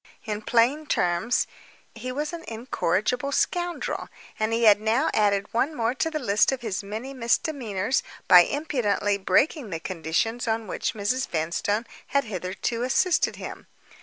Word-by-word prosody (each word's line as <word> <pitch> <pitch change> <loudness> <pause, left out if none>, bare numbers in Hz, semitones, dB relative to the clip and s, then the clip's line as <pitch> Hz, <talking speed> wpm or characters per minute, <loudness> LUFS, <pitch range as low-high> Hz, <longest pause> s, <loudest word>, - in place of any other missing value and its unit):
In 210 -2 -3
plain 250 +8 +2
terms, 180 +5 +1 0.5
he 240 +2 -6
was 295 +5 -3
an 335 -1 -6
incorrigible 230 +2 -1
scoundrel; 350 +4 -1 0.3
and 215 +1 0
he 230 +1 +1
had 210 -2 +6
now 230 +7 +2
added 200 -1 +1
one 275 +7 +1
more 230 -1 0
to 325 +5 -1
the 315 - -3
list 215 -6 +3
of 265 -2 -3
his 215 -4 -3
many 220 +7 -6
misdemeanors 235 -3 0 0.3
by 180 - +10
impudently 210 - +1
breaking 270 - +2
the 165 -3 -3
conditions 185 +8 -2
on 225 0 0
which 215 - -3
Mrs. 250 +6 0
Vanstone 175 +7 -1 0.2
had 280 0 +1
hitherto 195 +3 -3
assisted 315 +8 +2
him. - - -8
230 Hz, 150 wpm, -25 LUFS, 205-265 Hz, 0.5 s, by